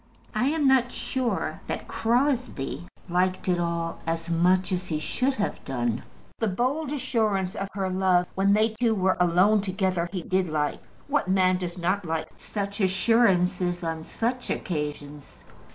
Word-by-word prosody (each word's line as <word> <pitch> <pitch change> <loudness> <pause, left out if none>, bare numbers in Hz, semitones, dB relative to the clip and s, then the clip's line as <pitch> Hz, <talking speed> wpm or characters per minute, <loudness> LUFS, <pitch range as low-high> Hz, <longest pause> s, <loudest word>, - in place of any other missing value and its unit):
I 215 +3 +1
am 300 -1 +2
not 255 -2 +4
sure 260 -3 -2
that - - -4
Crosbie 240 - 0 0.2
liked 185 +1 0
it 180 -1 +2
all 170 -1 -2
as 165 +1 -2
much 180 +2 +3
as 180 0 -1
he 155 - -1
should 255 - 0
have 205 - -2
done. 120 -3 -1 0.4
The 225 - +1
bold 260 +9 -1
assurance 220 -9 0
of 195 - -3
her 195 -1 -1
love 185 -1 +2
when 195 +1 +3
they 215 +2 +4
two 220 0 +1
were 190 -1 +2
alone 180 +4 +4
together 185 -3 -1
he 185 -3 -4
did 185 -2 0
like. 150 -1 -1 0.3
What 290 -8 +1
man 185 -1 +3
does 175 -1 -5
not 185 +3 0
like 160 -2 -3
such 200 0 -4
assurances 185 -3 +2
on 165 -1 -3
such 245 +7 -2
occasions? 150 -3 -4
185 Hz, 155 wpm, -26 LUFS, 175-220 Hz, 0.4 s, not